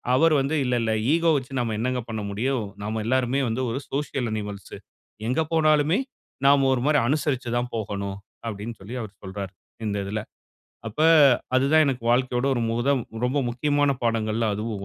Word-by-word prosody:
அவர் 160 Hz, +4 st, +4 dB
வந்து, 140 Hz, +4 st, -1 dB
"இல்ல 125 Hz, 0 st, +1 dB
இல்ல, 110 Hz, -, 0 dB, 0.2 s
ஈகோ 165 Hz, 0 st, +3 dB
வைச்சு 130 Hz, -1 st, -2 dB
நம்ம 115 Hz, -2 st, -2 dB
என்னங்க 125 Hz, +2 st, -1 dB
பண்ண 110 Hz, -1 st, -3 dB
முடியும்? 120 Hz, +3 st, -1 dB, 0.2 s
நம்ம 110 Hz, +1 st, -2 dB
எல்லோருமே 130 Hz, +2 st, +1 dB
வந்து 120 Hz, +3 st, -1 dB
ஒரு 130 Hz, -, -2 dB
சோசியல் 135 Hz, -4 st, -2 dB
அனிமல்ஸ். 105 Hz, -2 st, -6 dB, 0.5 s
எங்க 130 Hz, +6 st, +1 dB
போனாலுமே 155 Hz, +3 st, +3 dB, 0.5 s
நாம 140 Hz, -1 st, +5 dB
ஒரு 125 Hz, -, 0 dB
மாரி 150 Hz, -1 st, +4 dB
அனுசரிச்சு 135 Hz, -3 st, 0 dB
தான் 120 Hz, 0 st, -2 dB
போகணும்." 100 Hz, -2 st, -4 dB, 0.3 s
அப்படின்னு 110 Hz, +1 st, -5 dB
சொல்லி 105 Hz, +6 st, -7 dB
அவர் 105 Hz, -2 st, -9 dB
சொல்றார், 95 Hz, 0 st, -6 dB, 0.3 s
இந்த 105 Hz, -1 st, -1 dB
இதில. 105 Hz, +2 st, -3 dB, 0.7 s
அப்ப 110 Hz, -, -15 dB, 0.6 s
அது 130 Hz, +1 st, +4 dB
தான் 155 Hz, 0 st, +6 dB
எனக்கு 130 Hz, -4 st, -1 dB
வாழ்க்கையோட 125 Hz, +1 st, +1 dB
ஒரு -, -, 0 dB
முதல், 130 Hz, +3 st, +1 dB, 0.3 s
ரொம்ப 130 Hz, +4 st, 0 dB
முக்கியமான 145 Hz, +3 st, +1 dB
பாடங்கள்ல 115 Hz, -1 st, 0 dB
அதுவும் 105 Hz, -1 st, -4 dB
125 Hz, 165 wpm, -25 LUFS, 110-140 Hz, 0.7 s, தான்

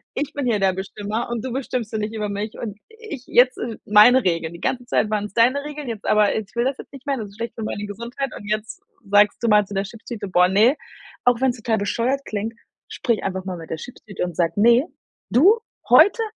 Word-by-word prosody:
Ich 290 Hz, +1 st, -3 dB
bin 285 Hz, -2 st, -3 dB
hier 220 Hz, -4 st, +1 dB
der 190 Hz, -1 st, +2 dB
Bestimmer 205 Hz, +4 st, -4 dB
und 240 Hz, 0 st, -3 dB
du 260 Hz, -, -4 dB
bestimmst 250 Hz, -4 st, -3 dB
hier 220 Hz, -, -2 dB
nicht 215 Hz, +1 st, -3 dB
über 210 Hz, -1 st, -2 dB
mich 205 Hz, +2 st, -4 dB
und 210 Hz, -3 st, -6 dB
ich 440 Hz, -, -9 dB
jetzt 250 Hz, +1 st, +4 dB
sind 230 Hz, -2 st, -5 dB
meine 225 Hz, +5 st, +6 dB
Regeln. 165 Hz, -2 st, -1 dB
Die 170 Hz, -, -10 dB
ganze 245 Hz, -1 st, -2 dB
Zeit 215 Hz, -, +1 dB
waren 210 Hz, -1 st, 0 dB
es 210 Hz, -, -10 dB
deine 250 Hz, +6 st, +3 dB
Regeln. 295 Hz, -2 st, -7 dB
Jetzt 220 Hz, -3 st, -6 dB
aber 210 Hz, -1 st, +3 dB
ich 220 Hz, -, -2 dB
will 235 Hz, +1 st, +1 dB
das 265 Hz, +1 st, -1 dB
jetzt -, -, -11 dB
nicht 275 Hz, 0 st, -12 dB
mehr. 280 Hz, -2 st, 0 dB
Das 220 Hz, -3 st, -5 dB
ist 200 Hz, -, -17 dB
schlecht 230 Hz, 0 st, -4 dB
für 225 Hz, -, -5 dB
meine 210 Hz, -1 st, -4 dB
Gesundheit.“ 235 Hz, +6 st, -5 dB
Und -, -, -10 dB
jetzt 215 Hz, -, -3 dB, 0.3 s
sagst 205 Hz, +1 st, +5 dB
du -, -, +2 dB
mal 210 Hz, -1 st, +5 dB
zu 200 Hz, -, -9 dB
der 195 Hz, -, +1 dB
Chipstüte: 215 Hz, 0 st, -8 dB
„Boah, 180 Hz, -1 st, +4 dB
ne!“ 215 Hz, +9 st, +4 dB, 0.5 s
Auch 245 Hz, -1 st, +4 dB
wenn's 260 Hz, -2 st, +1 dB
total 225 Hz, -1 st, 0 dB
bescheuert 240 Hz, +7 st, -1 dB
klingt, 215 Hz, +2 st, -3 dB, 0.3 s
sprich 235 Hz, -3 st, -1 dB
einfach 190 Hz, -1 st, -3 dB
mal 185 Hz, -2 st, -4 dB
mit 165 Hz, -1 st, -10 dB
der 160 Hz, -, -3 dB
Chipstüte 205 Hz, +1 st, -7 dB
und 175 Hz, -2 st, -4 dB
sage: 170 Hz, -1 st, +1 dB
„Ne, 235 Hz, +8 st, +5 dB, 0.4 s
du, 385 Hz, -, +5 dB, 0.3 s
heute 320 Hz, -, +6 dB
225 Hz, 240 wpm, -22 LUFS, 205-255 Hz, 0.5 s, meine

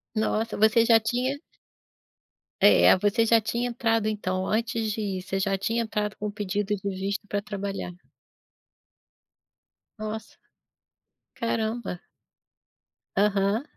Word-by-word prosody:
Nossa, 220 Hz, +1 st, 0 dB
você 220 Hz, +2 st, +5 dB
já 225 Hz, -1 st, +6 dB
tinha 250 Hz, +5 st, -1 dB, 1.2 s
É, -, -, +7 dB
você 210 Hz, +4 st, +2 dB
já 225 Hz, 0 st, +5 dB
tinha 235 Hz, +3 st, -1 dB
entrado 225 Hz, -2 st, +1 dB
então 185 Hz, -3 st, -2 dB
antes 225 Hz, 0 st, 0 dB
de 220 Hz, -, -3 dB
ir, 195 Hz, -3 st, -2 dB
você 195 Hz, +1 st, -3 dB
já 195 Hz, 0 st, 0 dB
tinha 225 Hz, +4 st, 0 dB
entrado 210 Hz, -1 st, -2 dB
com 210 Hz, -, -3 dB
o -, -, -4 dB
pedido 205 Hz, 0 st, -2 dB
de 200 Hz, 0 st, -4 dB
visto 195 Hz, +2 st, -3 dB
pra 205 Hz, 0 st, -1 dB
trabalhar. 200 Hz, -3 st, -5 dB, 2.1 s
Nossa. 215 Hz, +1 st, -6 dB, 1.0 s
Caramba. 225 Hz, -4 st, -2 dB, 1.2 s
Aham. 200 Hz, +3 st, +2 dB
215 Hz, 120 wpm, -26 LUFS, 200-225 Hz, 2.1 s, É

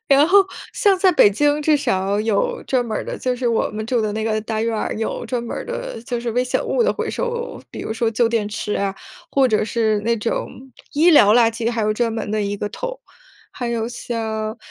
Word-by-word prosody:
然 280 Hz, 0 st, +5 dB
后， 390 Hz, +3 st, +6 dB, 0.3 s
像 400 Hz, -5 st, +3 dB
在 375 Hz, -1 st, +5 dB
北 205 Hz, -, +6 dB
京 290 Hz, +7 st, +2 dB
至 305 Hz, 0 st, +4 dB
少 200 Hz, -7 st, 0 dB
有 215 Hz, -2 st, 0 dB
专 255 Hz, -2 st, +1 dB
门 220 Hz, -, -3 dB
儿 -, -, -3 dB
的 -, -, -5 dB
就 255 Hz, -1 st, -1 dB
是 245 Hz, 0 st, -2 dB
我 230 Hz, -, +1 dB
们 215 Hz, 0 st, -5 dB
住 240 Hz, -1 st, +1 dB
的 215 Hz, -1 st, -1 dB
那 220 Hz, +1 st, -2 dB
个 215 Hz, -1 st, 0 dB
大 220 Hz, 0 st, -3 dB
院 230 Hz, 0 st, 0 dB
儿， -, -, -2 dB
有 220 Hz, +2 st, -3 dB
专 235 Hz, 0 st, -2 dB
门 235 Hz, -, -5 dB
儿 -, -, -5 dB
的， -, -, -5 dB
就 240 Hz, -1 st, -3 dB
是 235 Hz, -1 st, -2 dB
危 245 Hz, +2 st, +2 dB
险 250 Hz, -, -1 dB
物 485 Hz, -, +1 dB
的 485 Hz, -, +2 dB
回 -, -, -3 dB
收， 480 Hz, 0 st, -3 dB
比 -, -, -7 dB
如 220 Hz, -, -4 dB
说 225 Hz, 0 st, 0 dB
旧 230 Hz, +1 st, +2 dB
电 225 Hz, -3 st, 0 dB
池 210 Hz, 0 st, -3 dB
啊， 195 Hz, -1 st, -1 dB, 0.4 s
或 270 Hz, -2 st, +4 dB
者 215 Hz, -1 st, +2 dB
是 220 Hz, -2 st, +1 dB
那 230 Hz, +2 st, 0 dB
种 225 Hz, +2 st, -2 dB, 0.4 s
医 325 Hz, +4 st, +5 dB
疗 210 Hz, -9 st, +7 dB
垃 235 Hz, -2 st, +5 dB
圾 230 Hz, 0 st, -1 dB
还 230 Hz, -1 st, -2 dB
有 215 Hz, 0 st, +2 dB
专 230 Hz, 0 st, 0 dB
门 225 Hz, -2 st, -4 dB
的 215 Hz, -1 st, 0 dB
一 200 Hz, 0 st, -2 dB
个 205 Hz, -, -3 dB
桶。 -, -, -6 dB, 0.5 s
还 245 Hz, -, -4 dB
有 230 Hz, -1 st, -1 dB
像， 220 Hz, -2 st, -4 dB
230 Hz, 260 characters per minute, -21 LUFS, 215-265 Hz, 0.5 s, 疗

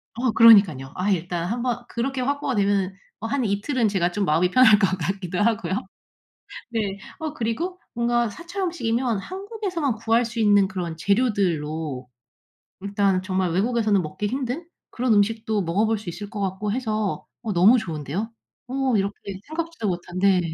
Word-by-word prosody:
어 245 Hz, 0 st, +1 dB
그러니깐요. 200 Hz, -, +6 dB
아 185 Hz, +3 st, -1 dB
일단 175 Hz, -1 st, -1 dB
한번 240 Hz, +2 st, -2 dB
그렇게 260 Hz, +2 st, -2 dB
확보가 280 Hz, 0 st, -1 dB
되면은 200 Hz, -2 st, +1 dB, 0.3 s
어 -, -, -1 dB
한 255 Hz, 0 st, 0 dB
이틀은 220 Hz, +4 st, 0 dB
제가 180 Hz, -3 st, +1 dB
좀 205 Hz, +2 st, -1 dB
마음이 170 Hz, +3 st, +2 dB
편할 235 Hz, -4 st, +7 dB
것 195 Hz, -, +4 dB
같기도 180 Hz, +1 st, -3 dB
하고요. 220 Hz, -2 st, +1 dB, 1.0 s
네. 205 Hz, -4 st, -2 dB, 0.2 s
어 310 Hz, -1 st, -4 dB
그리고 310 Hz, +10 st, -3 dB
뭔가 240 Hz, -1 st, +1 dB
사찰 345 Hz, -, -7 dB
음식이면 240 Hz, -, 0 dB
한국에서만 375 Hz, -, -3 dB
구할 230 Hz, +2 st, +2 dB
수 230 Hz, 0 st, -5 dB
있는 205 Hz, -2 st, +5 dB
그런 175 Hz, -4 st, -4 dB
재료들로 160 Hz, -, 0 dB, 0.7 s
일단 200 Hz, -2 st, +1 dB
정말 185 Hz, -2 st, -1 dB
외국에서는 215 Hz, +1 st, +2 dB
먹기 175 Hz, +6 st, -4 dB
힘든 260 Hz, +7 st, -3 dB, 0.2 s
그런 245 Hz, -1 st, +1 dB
음식도 215 Hz, 0 st, +1 dB
먹어볼 210 Hz, +6 st, +1 dB
수 200 Hz, -4 st, -7 dB
있을 205 Hz, +4 st, -7 dB
것 210 Hz, -, -6 dB
같고 200 Hz, +1 st, -2 dB
해서 215 Hz, -4 st, -2 dB, 0.2 s
어 225 Hz, -3 st, -3 dB
너무 195 Hz, +8 st, +6 dB
좋은데요. 170 Hz, -, -4 dB, 0.4 s
어 260 Hz, -1 st, 0 dB
이렇게 200 Hz, +1 st, 0 dB, 0.3 s
생각지도 325 Hz, -7 st, -4 dB
못한 175 Hz, 0 st, -5 dB
네. 195 Hz, -1 st, +4 dB
215 Hz, 340 characters per minute, -24 LUFS, 190-245 Hz, 1.0 s, 편할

